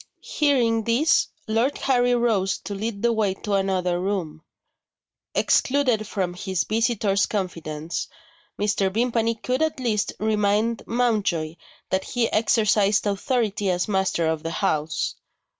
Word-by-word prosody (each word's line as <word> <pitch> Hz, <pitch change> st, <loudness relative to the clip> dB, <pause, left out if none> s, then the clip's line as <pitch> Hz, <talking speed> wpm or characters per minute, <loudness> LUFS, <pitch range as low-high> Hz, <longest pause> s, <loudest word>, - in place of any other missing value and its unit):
Hearing 240 Hz, -7 st, +1 dB
this, 245 Hz, +8 st, +3 dB, 0.2 s
Lord 230 Hz, +6 st, +1 dB
Harry 245 Hz, -2 st, +2 dB
rose 220 Hz, -6 st, +1 dB
to 205 Hz, -, -6 dB
lead 205 Hz, +1 st, -4 dB
the 235 Hz, 0 st, +3 dB
way 210 Hz, -4 st, 0 dB
to 205 Hz, +1 st, -4 dB
another 185 Hz, -2 st, +1 dB
room. 180 Hz, -6 st, -3 dB, 0.9 s
Excluded 255 Hz, -6 st, +2 dB
from 185 Hz, -4 st, -2 dB
his 185 Hz, -1 st, -2 dB
visitor's 215 Hz, -3 st, +1 dB
confidence, 165 Hz, -5 st, -4 dB, 0.5 s
Mr. 200 Hz, -2 st, +1 dB
Vimpany 230 Hz, +1 st, +1 dB
could 250 Hz, +5 st, -2 dB
at 315 Hz, -3 st, 0 dB
least 220 Hz, -5 st, 0 dB
remind 215 Hz, +1 st, +1 dB
Mountjoy 210 Hz, -10 st, 0 dB, 0.4 s
that 190 Hz, 0 st, +1 dB
he 240 Hz, -2 st, 0 dB
exercised 215 Hz, -2 st, +2 dB
authority 205 Hz, -1 st, 0 dB
as 180 Hz, 0 st, 0 dB
master 190 Hz, -4 st, 0 dB
of 160 Hz, -1 st, 0 dB
the 165 Hz, -, -4 dB
house. 155 Hz, -1 st, -1 dB
210 Hz, 125 wpm, -24 LUFS, 190-230 Hz, 0.9 s, this